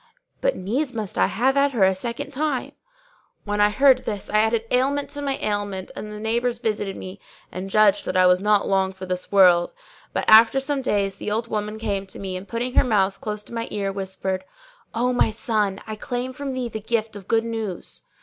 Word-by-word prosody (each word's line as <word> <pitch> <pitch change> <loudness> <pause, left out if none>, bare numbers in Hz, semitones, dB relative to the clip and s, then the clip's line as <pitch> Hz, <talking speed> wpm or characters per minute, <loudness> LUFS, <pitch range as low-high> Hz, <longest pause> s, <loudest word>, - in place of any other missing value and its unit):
But - - +1
needs 250 +8 -2
must 215 -4 -4
I - - +3
have 255 +7 +1
at 280 0 +3
her 220 -6 +2
a 190 0 +5
second 240 +8 -5
time."[FN#606] 290 -1 -2 0.7
When 205 0 -1
I 205 - +6
heard 260 +4 +5
this 205 -2 -4
it - - -8
added 220 +1 +3
ailment 275 +3 +1
to 290 - -4
my 275 -1 -1
ailment 205 -3 -3
and 210 - -6
the 210 - -7
neighbours 235 +2 0
visited 210 -4 -2
me 185 +1 -8 0.3
and 185 +1 -6
judged 205 0 +4
that - - -1
I 185 - +6
was 180 0 +4
not 210 0 +3
long 190 -1 +1
for 190 0 -8
this 180 0 -4
world; 180 -3 +5 0.4
but - - -2
after 225 +4 +7
some 270 0 -1
days, 200 -5 0
the - - -4
old 225 +2 -2
woman 210 0 -3
came 200 -3 -2
to - - -10
me 190 -2 -5
and, 185 +2 -7
putting 240 +3 -3
her - - +5
mouth 200 -3 +1
close 210 -4 -4
to 235 - -13
my 230 0 -3
ear, 200 -1 -2
whispered, 190 -1 -3 0.5
"O 250 +2 +1
my 245 - +3
son; 215 -3 -1
I 215 - -5
claim 245 +4 -4
from 275 0 -5
thee 255 -2 -2
the 220 -1 -5
gift 220 0 -2
of 195 -2 -10
good 225 0 +2
news." 220 -5 -4
215 Hz, 215 wpm, -23 LUFS, 195-245 Hz, 0.7 s, after